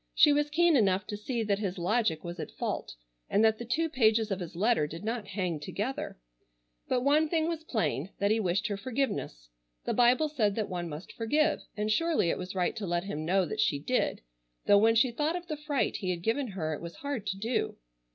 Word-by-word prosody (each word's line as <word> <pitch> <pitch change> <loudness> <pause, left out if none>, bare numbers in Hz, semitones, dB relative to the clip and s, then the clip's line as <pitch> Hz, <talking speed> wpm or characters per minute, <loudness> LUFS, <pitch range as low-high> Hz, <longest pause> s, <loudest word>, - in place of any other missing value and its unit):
She 295 - +7
was 295 0 +1
keen 340 +1 +4
enough 195 -5 +3
to 210 - -5
see 230 +3 -2
that 205 -2 0
his 195 -3 -3
logic 180 -2 +1
was 175 0 -6
at - - -4
fault, - - -4 0.3
and 215 +2 +4
that 220 0 +3
the 235 - -5
two 315 +8 +1
pages 225 -6 +2
of 195 - -1
his 175 -2 -7
letter 205 -4 +2
did 165 +5 -8
not 225 -1 -3
hang 185 -6 -2
together, 215 - -4 0.7
but 250 - +1
one 300 +3 +3
thing 320 -1 +1
was 330 -2 -3
plain, 175 - -1
that 200 +1 +1
he 220 - +3
wished 195 +2 0
her 205 -3 -1
forgiveness. 205 - -3 0.4
The - - 0
Bible 245 +5 +4
said 220 -9 0
that 215 -2 -2
one 175 -2 -3
must 150 +4 -8
forgive, 300 +8 +1 0.2
and 210 +1 0
surely 320 - +2
it - - -3
was 185 +1 -6
right 180 -2 0
to 205 -3 -3
let 175 0 0
him 155 -5 -4
know 185 +2 +2
that - - -5
she 145 - +2
did, 250 - 0 0.4
though 205 - +6
when 225 +2 +4
she 235 +2 +4
thought 300 +7 0
of 355 -1 -5
the 310 - -4
fright 295 -2 -1
he 185 - -3
had 175 -2 -2
given 250 +6 0
her 170 -7 -3
it 150 - -6
was 170 0 -7
hard 280 -8 -4
to 190 0 -2
do. 225 +5 -1
215 Hz, 230 wpm, -30 LUFS, 185-260 Hz, 0.7 s, She